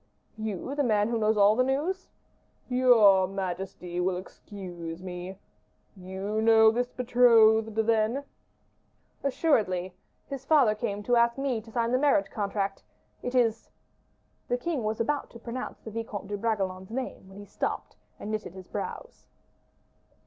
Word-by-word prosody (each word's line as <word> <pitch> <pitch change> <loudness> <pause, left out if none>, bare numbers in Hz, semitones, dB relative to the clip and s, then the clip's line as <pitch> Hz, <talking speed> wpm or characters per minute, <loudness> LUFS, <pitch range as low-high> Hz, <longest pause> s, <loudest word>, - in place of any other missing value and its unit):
"You, 215 +4 -4
the 290 0 0
man 210 -3 +2
who 230 -1 0
knows 215 0 +2
all 205 +1 +6
the 255 - +3
news?" 305 +9 -1 0.6
"Your 225 -7 +5
majesty 185 -2 -4
will 180 0 0
excuse 180 -3 -8
me. 180 +1 -7 0.6
You 190 +3 -4
know 220 0 +6
this 245 +2 -1
betrothed, 225 -3 +4
then?" 225 +4 +1 1.0
"Assuredly! 205 - +1 0.3
his 275 -2 -6
father 270 -7 +4
came 210 -2 -4
to 245 +2 +2
ask 235 +1 +3
me 270 -5 -1
to 225 - -15
sign 235 0 0
the 255 - +2
marriage 265 -9 +2
contract: 200 -1 -2 0.4
it 245 +1 -4
is 230 -3 +1 0.4
" - - -42
The 245 - +1
king 280 -1 -2
was 215 +1 -2
about 285 +5 -1
to 235 - -12
pronounce 235 +2 -6
the 220 - -9
Vicomte 215 -3 -5
de 205 - -2
Bragelonne's 190 -4 -2
name, 240 -5 -5
when 190 - -13
he 205 - -9
stopped, - - -4 0.2
and 210 - -5
knitted 215 -4 -4
his 185 -1 -10
brows. 340 - -7
220 Hz, 150 wpm, -28 LUFS, 195-245 Hz, 1.0 s, all